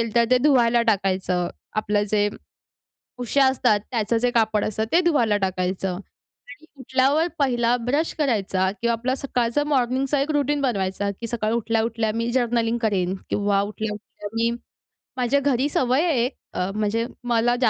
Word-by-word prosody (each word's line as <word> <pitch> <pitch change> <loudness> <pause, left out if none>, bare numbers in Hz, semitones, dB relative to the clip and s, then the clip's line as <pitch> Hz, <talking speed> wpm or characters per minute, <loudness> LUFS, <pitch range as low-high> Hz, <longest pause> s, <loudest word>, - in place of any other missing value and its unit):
तर 235 0 +5
ते 255 - +6
धुवायला 245 -4 +3
टाकायचं, 185 -3 0 0.3
आपलं 210 -1 +1
जे 205 -1 +2 0.9
उश्या 250 +3 +2
असतात, 235 -5 +2
त्याचं 230 -2 0
जे 245 +2 +1
कापड 220 -3 +1
असतं, 220 +1 -1
ते 340 - +5
धुवायला 240 -11 +2
टाकायचं. 185 0 -1 0.5
आणि 290 +3 -13
उठल्यावर 265 +5 +2
पहिला 245 -4 +2
ब्रश 285 +7 0
करायचा 195 -9 +1
किंवा 235 0 +1
आपला 245 +3 -1
सकाळचं 255 +1 -1
मॉर्निंगचा 265 +1 +1
एक 285 - -1
रूटीन 290 0 +1
बनवायचा, 200 -6 -1
की 230 - -4
सकाळी 225 -1 -1
उठल्या-उठल्या 225 -1 0
मी 230 +1 -1
जर्नलिंग 235 -2 +1
करेन 190 -4 0 0.2
किंवा 200 -1 +1
उठल्या-उठल्या 210 0 -6
मी 230 +1 +1 0.7
माझ्या 250 +3 +2
घरी 275 -1 +1
सवय 260 +1 +1
आहे, 250 -5 +1 0.2
अ, 180 - -1
म्हणजे 215 +2 0 0.3
मला 235 +1 +3
235 Hz, 145 wpm, -23 LUFS, 210-260 Hz, 0.9 s, ते